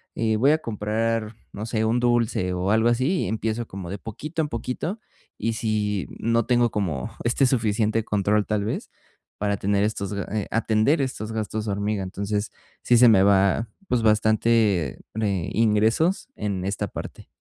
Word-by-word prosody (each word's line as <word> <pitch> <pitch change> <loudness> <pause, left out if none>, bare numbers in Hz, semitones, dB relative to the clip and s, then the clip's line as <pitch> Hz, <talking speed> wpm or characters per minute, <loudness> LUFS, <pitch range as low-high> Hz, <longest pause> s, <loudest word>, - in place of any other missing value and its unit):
Eh, 110 -1 +1
voy 135 +6 +4
a 155 - +4
comprar, 110 -1 -2 0.2
no 105 - -5
sé, 110 -1 -1
un 115 +2 +2
dulce 120 -6 +1
o 90 +2 -1
algo 110 +2 +4
así, 130 +10 +1
y - - -2
empiezo 110 +2 -2
como 95 -2 -7
de 100 - -4
poquito 150 - -4
en 150 - -2
poquito, 125 - -4 0.4
y 115 +2 -1
si 105 -3 -1
no 115 0 +1
tengo 120 -2 +2
como 85 -12 -2
este 120 +3 +2
suficiente 110 -3 +1
control, 105 +1 +1
tal 105 -2 -1
vez, 110 - -3 0.5
para 100 0 0
tener 100 +1 +1
estos, 105 -2 -3
a 100 -2 -2
eh, 105 - -2
atender 115 +6 +2
estos 120 -5 -3
gastos 110 0 -3
hormiga. 100 0 -1
Entonces, 100 +2 -3 0.3
sí 120 - +4
se 125 - +7
me 95 -4 +6
va, 100 +3 +3 0.2
pues, 125 - +1
bastante, 110 - +2 0.2
ne 100 -5 -1
ingresos 115 - +2
en 100 -3 -3
esta 100 -1 -2
parte. - - -8
110 Hz, 170 wpm, -24 LUFS, 100-115 Hz, 0.5 s, se